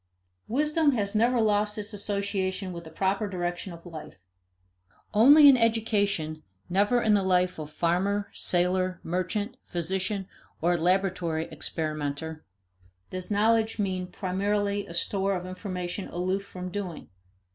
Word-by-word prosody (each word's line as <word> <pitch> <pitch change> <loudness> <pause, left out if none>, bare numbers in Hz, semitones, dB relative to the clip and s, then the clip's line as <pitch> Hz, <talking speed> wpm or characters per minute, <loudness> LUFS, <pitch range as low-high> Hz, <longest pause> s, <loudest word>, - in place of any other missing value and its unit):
Wisdom 300 +4 +2
has 205 -4 -1
never 235 +3 +3
lost 210 -1 +2
its 210 +1 -6
association 200 -2 -2
with 170 -1 -8
the - - -9
proper 195 +5 0
direction 175 0 -3
of 170 0 -11
life. 160 -3 -9 1.0
Only 285 +8 +8
in 275 - +9
education, 205 -9 +1 0.3
never 205 +7 +3
in 215 - +4
the 205 - +4
life 180 -2 +2
of 150 -1 -6
farmer, 185 +6 0
sailor, 180 0 +1
merchant, 185 +7 -2
physician, 190 +3 -2 0.3
or 175 +2 +2
laboratory 175 -2 +1
experimenter, 155 0 -4 0.7
does 185 -1 -5
knowledge 220 +2 +2
mean 185 -3 -1
primarily 200 +2 -1
a 170 - -7
store 195 +2 0
of 180 -1 -4
information 185 0 -5
aloof 185 +3 -1
from 185 -1 -6
doing. 185 -5 -5
190 Hz, 130 wpm, -27 LUFS, 175-210 Hz, 1.0 s, in